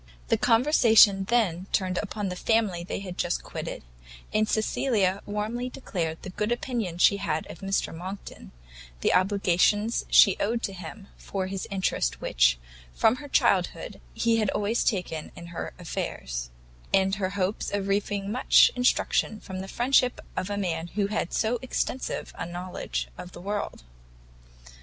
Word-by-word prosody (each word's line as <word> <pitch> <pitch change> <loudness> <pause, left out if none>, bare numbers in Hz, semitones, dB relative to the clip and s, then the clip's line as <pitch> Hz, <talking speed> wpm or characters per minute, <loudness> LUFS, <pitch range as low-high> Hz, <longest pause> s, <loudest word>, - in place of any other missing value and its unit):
The - - +4
conversation 225 -5 +5
then 195 -6 +1
turned 185 -2 0
upon 205 -1 -4
the 180 - -4
family 205 -4 +1
they 180 - -4
had 185 -2 -7
just - - -1
quitted, - - -6 0.5
and 215 0 +2
Cecilia 215 -3 +1
warmly 215 +4 -2
declared 165 -11 -4
the 185 - -6
good 210 +4 -2
opinion 235 -8 -2
she 200 +3 +5
had 160 -6 -2
of - - -11
Mr 195 -4 -1
Monckton, 185 - -8 0.5
the - - +2
obligations 200 +3 +2
she 195 - +7
owed 230 +3 0
to 195 - -2
him 190 +3 -9
for 190 -2 -4
the 190 0 -4
interest 190 - -1
which, - - +3 0.4
from 225 - +3
her 290 - -9
childhood, - - +1
he 230 -1 +2
had 215 -3 +1
always 210 +3 0
taken 180 -7 -2
in 170 - -9
her - - -4
affairs; - - -4 0.4
and 195 0 +3
her 185 - +1
hopes 190 +2 -1
of 200 -1 -2
reaping 200 0 -1
much 250 +4 +5
instruction 245 -3 +1
from 190 -2 -7
the 190 - -6
friendship 250 +2 +2 0.2
of 185 - -2
a 205 - -2
man 170 -4 -2
who 205 -1 +2
had 210 -5 -2
so 230 +2 0
extensive 260 0 -3
a 165 - -3
knowledge 175 - -4
of 180 - -9
the - - -9
world. 200 - -4
200 Hz, 155 wpm, -27 LUFS, 180-220 Hz, 0.5 s, she